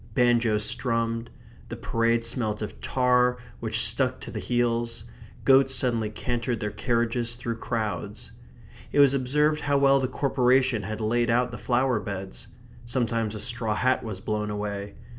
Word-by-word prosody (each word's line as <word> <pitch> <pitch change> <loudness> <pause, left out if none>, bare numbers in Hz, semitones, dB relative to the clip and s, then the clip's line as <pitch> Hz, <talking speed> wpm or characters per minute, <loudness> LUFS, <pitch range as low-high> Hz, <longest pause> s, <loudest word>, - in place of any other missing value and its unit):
Banjoes 120 -4 +3
strummed; 115 -1 0 0.4
the - - -5
parade 115 0 0
smelt 110 -3 -1
of 105 - -8
tar 125 -1 +2 0.2
which 115 0 +1
stuck 125 +4 +1
to - - -8
the - - -4
heels; 120 -1 -1 0.4
goats 135 0 +5
suddenly 120 -4 +1
cantered 120 +1 -3
their 105 -1 -3
carriages 120 0 -1
through 120 -1 -4
crowds. 110 -2 -4 0.6
It - - +1
was 140 -1 +6
observed 150 +3 +1
how 145 -1 +1
well 140 0 +4
the 130 - 0
Corporation 130 -2 +2
had 110 +3 -5
laid 120 +2 +1
out 125 +1 +2
the 120 - -6
flower 125 -1 +1
beds. 95 - -6 0.4
Sometimes 115 -3 -1
a - - -5
straw 115 -2 0
hat 130 +3 +1
was 105 -4 -6
blown 105 0 -2
away. 105 -1 -4
120 Hz, 155 wpm, -26 LUFS, 110-125 Hz, 0.6 s, was